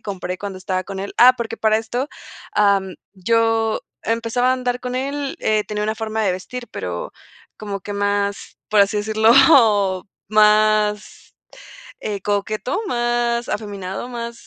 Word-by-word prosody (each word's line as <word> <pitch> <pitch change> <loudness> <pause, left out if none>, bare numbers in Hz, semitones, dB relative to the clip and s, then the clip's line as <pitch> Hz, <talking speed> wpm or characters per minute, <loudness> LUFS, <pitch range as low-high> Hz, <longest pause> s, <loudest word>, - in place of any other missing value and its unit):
compré 185 -3 -5
cuando 200 -1 -6
estaba 185 0 -3
con 195 0 -6
él. 200 - -5
Ah, 250 +1 +8
porque 230 -2 -4
para 220 -1 +2
esto, 240 +4 -3 0.5
am, 200 -2 +2 0.2
yo 225 +2 +1 0.2
empezaba 230 +2 0
a - - +4
andar 250 -1 -2
con 250 0 -5
él, 275 +2 -3
eh, 215 -1 +1
tenía 210 0 -3
una 215 +1 -1
forma 220 0 -2
de 200 - +2
vestir, 240 +7 -6
pero - - -5 0.4
como 200 -2 -5
que 205 - -7
más, 200 0 -2
por 215 - +2
así 200 +1 +3
decirlo, 220 +2 +3 1.0
más, 210 0 +2 0.7
eh, 205 -2 -3
coqueto, 215 - -2
más 240 -1 0
afeminado, 200 +1 -5
más 235 -1 -7
215 Hz, 145 wpm, -20 LUFS, 200-235 Hz, 1.0 s, Ah